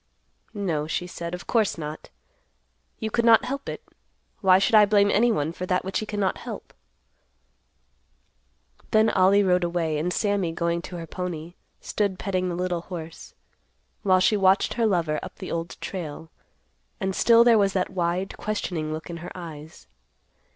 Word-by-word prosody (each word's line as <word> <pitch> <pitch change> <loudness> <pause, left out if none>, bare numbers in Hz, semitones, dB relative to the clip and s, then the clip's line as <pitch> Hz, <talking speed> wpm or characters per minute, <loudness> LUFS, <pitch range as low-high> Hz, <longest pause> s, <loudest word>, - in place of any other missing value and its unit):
"No," 165 -7 -1
she 175 - -2
said; 170 -1 -5
"of 180 - -10
course 220 -6 +1
not. 155 -1 -7 0.9
You 220 0 -4
could 235 - +1
not 230 -1 +6
help 275 +1 -4
it. - - -6 0.6
Why 185 -2 +6
should 195 - +1
I 215 -1 +8
blame 200 -1 +4
anyone 210 -9 +2
for 180 +1 -5
that 180 0 0
which 190 - -1
he 215 - -5
cannot 205 -3 -1
help?" - - -8 2.2
Then 220 0 +4
Ollie 195 +2 +4
rode 180 -1 +2
away, 170 -3 -1
and 175 +4 -1
Sammy, 200 -4 0
going 170 0 -1
to 180 - -8
her 170 -1 -6
pony, 170 -1 -5 0.3
stood 200 -3 -1
petting 185 -2 -1
the 175 - -3
little 180 -1 -2
horse, 165 -2 -9 0.7
while 185 -2 +4
she 210 - +3
watched 195 -1 +3
her 230 -2 +1
lover 165 -6 0
up - - -9
the - - -7
Old 165 +1 -4
Trail, 160 -3 -6 0.7
and 190 0 -2
still 235 0 +6
there 235 -2 +5
was 195 -1 +2
that 185 -1 -1
wide, 180 +1 -1
questioning 175 -7 -3
look 155 0 -5
in 170 - -6
her 170 - -8
eyes. 160 -3 -10
185 Hz, 165 wpm, -25 LUFS, 170-200 Hz, 2.2 s, I